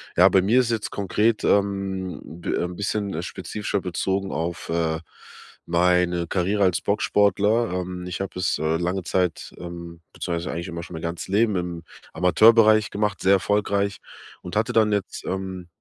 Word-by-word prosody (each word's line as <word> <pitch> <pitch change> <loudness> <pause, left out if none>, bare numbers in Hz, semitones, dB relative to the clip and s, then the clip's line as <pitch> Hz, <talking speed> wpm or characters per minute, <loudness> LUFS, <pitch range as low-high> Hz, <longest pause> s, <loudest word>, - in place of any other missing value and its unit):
Ja, 90 +3 +7
bei 95 0 +4
mir 115 +7 +4
ist 120 -1 -1
jetzt 110 -2 -2
konkret, 105 +3 0
ähm, 100 -2 0
d 85 +2 -8
ähm, 90 0 -1
'n - - -8
bisschen, 100 0 -2
äh, 80 - -3
spezifischer 105 +2 -4
bezogen 95 +2 -2
auf, 85 +2 -3
äh, 80 -1 0 0.7
meine 90 0 +2
Karriere 100 +3 +1
als 90 -2 +2
Boxsportler. 105 +2 +2
Ähm, 90 0 -4
ich 90 - -5
habe 95 -1 -5
es, 85 - +1
äh, 80 +1 +1
lange 90 +2 -2
Zeit, 90 -1 -1
ähm 85 -1 -8
beziehungsweise 85 -1 -3
eigentlich 85 +2 -4
immer 85 0 -6
schon 90 - -9
mein 80 - -7
ganzes 85 0 -4
Leben 105 0 +2
im 85 -2 -4 0.3
Amateurbereich 110 +4 +5
gemacht, 105 -1 -2
sehr 95 +1 +4
erfolgreich 100 0 +1 0.4
und 90 - -8
hatte 115 +3 0
dann 110 -2 +4
jetzt, 100 -2 -2
ähm, 95 -2 -4
95 Hz, 170 wpm, -24 LUFS, 85-100 Hz, 0.7 s, Ja